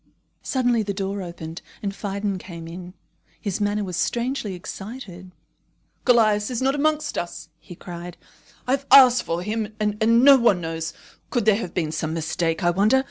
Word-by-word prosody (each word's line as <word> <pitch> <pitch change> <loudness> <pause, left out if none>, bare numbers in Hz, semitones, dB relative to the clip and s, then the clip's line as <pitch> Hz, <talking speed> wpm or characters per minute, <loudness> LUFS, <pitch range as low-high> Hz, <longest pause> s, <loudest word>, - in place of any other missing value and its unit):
Suddenly 245 -3 +1
the 200 -2 -3
door 195 0 -3
opened, 170 -2 -7 0.2
and 200 -1 -2
Phidon 200 -1 -3
came 170 -3 -9
in. 180 +2 -9 0.4
His 200 -2 -3
manner 205 0 0
was 180 -3 -4
strangely 235 -2 -1
excited. 190 0 -8 0.8
"Callias 215 -4 +4
is 245 -2 -2
not 265 +1 +2
amongst 305 +1 0
us," 170 -2 -6
he 175 - -12
cried. 175 0 -8 0.5
"I 250 - -1
have 275 +1 0
asked 250 -3 +8
for 170 +1 -3
him, 215 +1 -3
and 210 0 -1 0.2
no 280 0 +9
one 235 -7 +3
knows. 165 0 -4 0.4
Could 240 -4 0
there 215 -2 +5
have 185 -6 -6
been 160 -4 -1
some 160 0 -3
mistake, 165 +1 -1
I 175 - +4
wonder? 210 +8 +3
200 Hz, 170 wpm, -23 LUFS, 175-235 Hz, 0.8 s, no